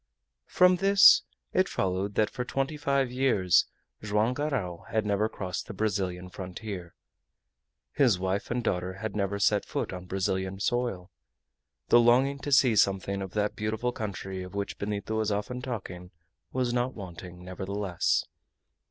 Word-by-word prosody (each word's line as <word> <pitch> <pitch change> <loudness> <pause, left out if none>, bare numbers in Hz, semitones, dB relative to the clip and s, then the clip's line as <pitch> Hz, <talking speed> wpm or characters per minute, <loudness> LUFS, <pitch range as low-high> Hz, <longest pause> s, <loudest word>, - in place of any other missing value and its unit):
From 180 0 +5
this 195 +1 +7 0.3
it - - +2
followed 95 +2 -1
that 110 -1 +2
for 125 - -3
twenty 135 +4 -2
five 140 -3 0
years 120 -9 +3 0.3
Joam 105 +3 +1
Garral 125 - -3
had 110 -1 0
never 105 +1 +1
crossed 90 -4 -5
the 105 - -7
Brazilian 95 -3 -1
frontier, 90 -1 -7 1.0
his 120 - +3
wife 95 +2 -2
and 120 0 -1
daughter 90 -3 -1
had 105 +2 -5
never 100 -1 -1
set 100 - +2
foot - - -3
on 90 0 -7
Brazilian 95 0 -2
soil. 100 -5 -1 0.8
The 120 - +7
longing 130 +4 +4
to 145 - -5
see 130 -4 +5
something 100 0 +2
of 95 -2 -6
that 105 0 0
beautiful 110 +3 -1
country 95 -4 -5
of 90 +2 -9
which 100 0 -4
Benito 105 +1 -3
was 110 -1 0
often 115 +5 -3
talking 95 -8 -6 0.4
was 125 -2 0
not 125 +1 0
wanting, 90 -2 -9
nevertheless. 95 0 -1
105 Hz, 150 wpm, -28 LUFS, 95-120 Hz, 1.0 s, this